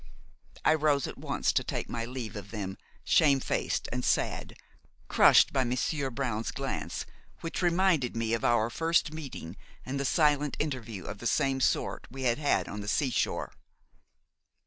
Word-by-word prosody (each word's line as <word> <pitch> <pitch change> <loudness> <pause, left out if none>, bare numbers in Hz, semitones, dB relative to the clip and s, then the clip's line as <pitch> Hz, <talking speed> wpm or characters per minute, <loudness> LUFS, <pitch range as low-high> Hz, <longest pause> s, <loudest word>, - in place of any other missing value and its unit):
I - - +6
rose 150 -3 +2
at - - -7
once - - 0
to - - +2
take - - -3
my 115 -1 -3
leave 120 -3 -6
of 100 -1 -7
them, 100 -3 -4 0.3
shamefaced 140 -4 +2
and 125 +1 -2
sad, - - 0 0.5
crushed - - +6
by 135 -2 +3
Monsieur 130 +3 -1
Brown's 120 -4 -2
glance, 135 -1 -4 0.4
which 165 - -3
reminded 175 -8 +2
me 115 0 -1
of 115 - -1
our 120 -1 +2
first 165 +1 +1
meeting 135 - -7 0.3
and 135 +2 -3
the - - 0
silent 150 -1 +2
interview 115 - -3
of 100 - -6
the 120 - -2
same 135 +5 +1
sort - - 0
we 135 +2 -7
had 120 +1 +2
had 145 -2 +1
on 105 - -5
the 100 - -7
sea 130 +4 +1
shore. - - -1
130 Hz, 165 wpm, -29 LUFS, 115-145 Hz, 0.5 s, I